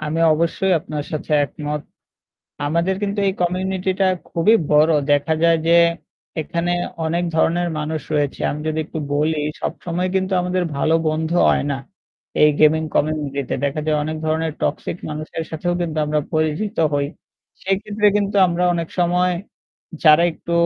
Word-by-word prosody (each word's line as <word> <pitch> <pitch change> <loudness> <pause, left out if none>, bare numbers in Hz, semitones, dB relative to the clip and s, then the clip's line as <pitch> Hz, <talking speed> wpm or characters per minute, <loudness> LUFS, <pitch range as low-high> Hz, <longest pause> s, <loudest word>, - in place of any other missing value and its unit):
আমি 155 +1 -2
অবশ্যই 170 +4 +1
আপনার 150 -2 -5
সাথে 155 0 -4
একমত। 150 +1 -5 0.9
আমাদের 170 +5 +1
কিন্তু 205 0 -1
এই 190 - +1
কমিউনিটি 185 +1 -1
টা 195 - +4 0.2
খুবই 200 +7 +4
বড়। 150 +2 +5 0.2
দেখা 145 +2 +2
যায় 165 0 +5
যে 170 - +5 0.7
এখানে 170 +3 -2 0.3
অনেক 170 +2 0
ধরনের 175 +2 +2
মানুষ 155 0 -3
রয়েছে। 145 -2 0
আমি 150 - -4
যদি 155 0 -1
একটু 160 - -6
বলি 155 +2 +1 0.2
সবসময় 180 +1 -2
কিন্তু 190 0 0
আমাদের 180 0 0
ভালো 155 +3 +2
বন্ধু 160 +2 -1 0.2
হয় - - +1
না 140 - -2 0.6
এই 150 - +7
গেমিং 155 +1 +5
কমিউনিটি 145 -2 0
তে। - - 0
দেখা 140 +2 -2
যায় 155 -1 +1
অনেক 155 +1 -3
ধরনের 160 +1 0
টক্সিক 155 - -2
মানুষের 155 +2 -5
সাথেও 170 +2 -2
কিন্তু 160 -2 -3
আমরা 150 0 +1
পরিচিত 155 +6 -1 0.2
হই। 145 0 +1 0.6
সেইক্ষেত্রে 205 +2 +1
কিন্তু 205 0 -1
আমরা 175 +1 -1
অনেক 170 -1 -2
সময় 180 +1 +2 0.7
যারা 155 +1 +7
একটু 170 - -7
160 Hz, 155 wpm, -20 LUFS, 155-180 Hz, 0.9 s, এই